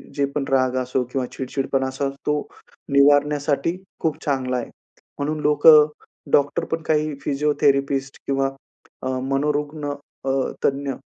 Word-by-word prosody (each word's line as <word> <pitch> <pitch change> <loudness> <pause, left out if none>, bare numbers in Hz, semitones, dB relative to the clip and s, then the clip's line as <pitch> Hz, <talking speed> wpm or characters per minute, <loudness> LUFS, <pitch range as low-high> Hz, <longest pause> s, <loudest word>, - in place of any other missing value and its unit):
जे 140 - +2
पण 145 - 0
राग 130 -1 +2
असो 125 0 -1
किंवा 130 -1 -1
चिडचिडपणा 135 0 -2
असा 135 +1 -2 0.2
तो 150 - +2 0.6
निवारण्यासाठी 145 +2 +3 0.2
खूप 160 -2 -1
चांगला 130 -3 0
आहे. 120 - -4 0.5
म्हणून 150 +2 -1
लोक 150 0 +3 0.7
डॉक्टर 145 0 +3
पण 165 - -1
काही 155 -1 +1
फिजिओथेरपिस्ट 140 -1 +1
किंवा 135 0 +1 0.5
अ, - - -2 0.2
मनोरुग्ण, 145 +2 -1 0.3
अ, - - 0 0.4
तज्ञ 140 0 0
140 Hz, 125 wpm, -22 LUFS, 135-150 Hz, 0.7 s, निवारण्यासाठी